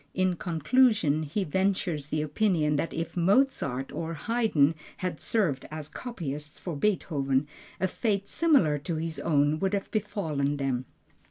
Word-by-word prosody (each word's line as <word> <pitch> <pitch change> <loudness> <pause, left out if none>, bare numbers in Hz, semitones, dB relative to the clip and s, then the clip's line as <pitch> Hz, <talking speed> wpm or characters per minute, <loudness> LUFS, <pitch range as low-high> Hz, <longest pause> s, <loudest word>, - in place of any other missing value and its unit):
In 185 -1 +2
conclusion 170 - +2
he 160 +7 -2
ventures 185 -4 0
the 150 0 -1
opinion 155 -1 +1
that 155 +3 -1
if 165 +1 -4
Mozart 175 - +2
or 165 0 -4
Haydn 210 -8 +2 0.2
had 180 -4 -3
served 175 - 0
as 155 0 -6
copyist 150 - -5
for 175 -4 -5
Beethoven, 145 -6 0 0.3
a 190 - +2
fate 200 0 -1
similar 270 - +3
to 165 +4 -3
his 160 -2 -3
own 145 0 +2
would 195 +1 +1
have 200 - -4
befallen 155 -9 -1
them. 130 -2 -1
165 Hz, 145 wpm, -28 LUFS, 145-195 Hz, 0.3 s, similar